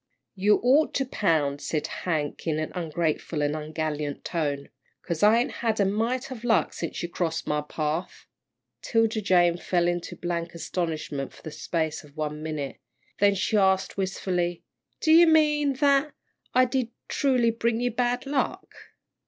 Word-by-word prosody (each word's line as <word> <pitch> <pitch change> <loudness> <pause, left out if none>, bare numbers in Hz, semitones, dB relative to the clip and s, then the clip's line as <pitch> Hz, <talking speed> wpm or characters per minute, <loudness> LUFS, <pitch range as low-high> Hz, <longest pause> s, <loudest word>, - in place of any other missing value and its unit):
"You 205 +2 +3
ought 275 +5 +4
to 270 - +1
pound," 155 - 0
said 155 -2 -2
Hank, 155 -3 -3
in 155 -1 +1
an 155 0 -3
ungrateful 160 -2 -2
and 145 +1 0
ungallant 155 -1 -3
tone, 145 -4 -2 0.3
"'cause 170 -3 -3
I 215 +2 +6
ain't 240 - +1
had 225 -2 0
a 200 - +4
mite 230 +7 -1
of 240 -3 -7
luck 235 -2 +2
since 165 - -4
you - - -1
crossed 165 -2 -2
my 150 0 0
path." 155 +3 -3 0.6
'Tilda 225 -1 +1
Jane 175 -3 +4
fell 175 0 +1
into 175 0 -2
blank 170 -1 -3
astonishment 160 -4 -3
for - - -17
the 155 - -6
space 160 +1 -2
of 150 0 -18
one 150 0 -3
minute, 155 -3 -4 0.4
then 200 0 +4
she 195 +3 0
asked, 190 -1 +2
wistfully, 180 -3 -2 0.4
"Do 315 - +3
you 335 +1 +8
mean 300 -3 +4
that 280 +2 +2 0.5
did 255 -1 0
I - - -33 0.2
truly 250 -4 +2
bring 230 0 0
you 245 0 0
bad 245 +2 0
luck?" 275 -1 -2
180 Hz, 160 wpm, -26 LUFS, 155-235 Hz, 0.6 s, you